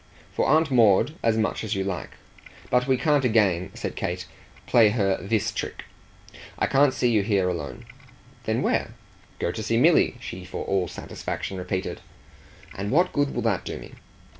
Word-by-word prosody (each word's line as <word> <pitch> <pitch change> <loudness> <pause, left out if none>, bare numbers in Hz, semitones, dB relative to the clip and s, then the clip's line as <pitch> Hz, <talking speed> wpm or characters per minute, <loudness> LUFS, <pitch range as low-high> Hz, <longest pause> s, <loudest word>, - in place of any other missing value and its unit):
"For - - +1
Aunt 155 +1 +3
Maud 115 +2 +4
as 115 -1 +2
much 110 0 -1
as 110 - -2
you 95 - -1
like. 95 -2 -4 0.6
But 125 +1 +3
we 130 -1 +3
can't 145 0 +2
again," 105 -7 +2
said - - -5
Kate, - - -3 0.4
"play 115 -3 +5
her 100 -3 +1
THIS 100 +3 0
trick. - - -5 0.7
I - - +2
can't 140 0 +4
see 125 - +2
you 110 -3 +3
here 100 -3 +1
alone." 75 -8 -4 0.6
"Then - - 0
where?" - - 0 0.4
"Go - - -1
to 110 - -5
see 110 +2 0
Milly," 155 0 +4
she 95 -6 -7
for 90 - -6
all 95 -2 0
satisfaction 95 +3 -5
repeated. 90 +1 -3 0.7
"And 100 +1 -4
what 175 +8 +2
good 145 -1 0
will 120 - -1
that 110 -6 0
do - - -5
me?" - - -11
110 Hz, 175 wpm, -25 LUFS, 95-125 Hz, 0.7 s, play